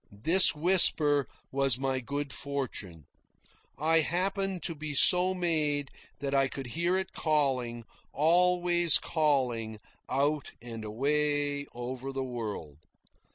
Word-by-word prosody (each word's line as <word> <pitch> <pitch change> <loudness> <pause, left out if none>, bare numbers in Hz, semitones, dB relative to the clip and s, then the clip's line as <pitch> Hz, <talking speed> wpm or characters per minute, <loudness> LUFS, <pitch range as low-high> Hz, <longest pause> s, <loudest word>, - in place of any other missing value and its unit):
This 165 - +4
whisper 150 -4 +3 0.2
was 135 -3 +2
my 135 0 -1
good 140 +3 -5
fortune. 120 - -5 0.7
I 160 +2 +2
happened 190 +3 -1
to 165 - -2
be 150 -1 -5
so 180 +6 +4
made 150 -5 -1 0.3
that 140 -1 -3
I 135 -1 +3
could 135 0 -7
hear 170 +9 -1
it 190 0 -4
calling, 130 -7 -1 0.3
always 175 +1 +3
calling, 125 -8 -1 0.3
out 145 +2 -1
and 115 -2 -8
away 145 +5 -1
over 130 +2 -6
the 135 0 -3
world. 110 - -6
145 Hz, 115 wpm, -29 LUFS, 130-165 Hz, 0.7 s, This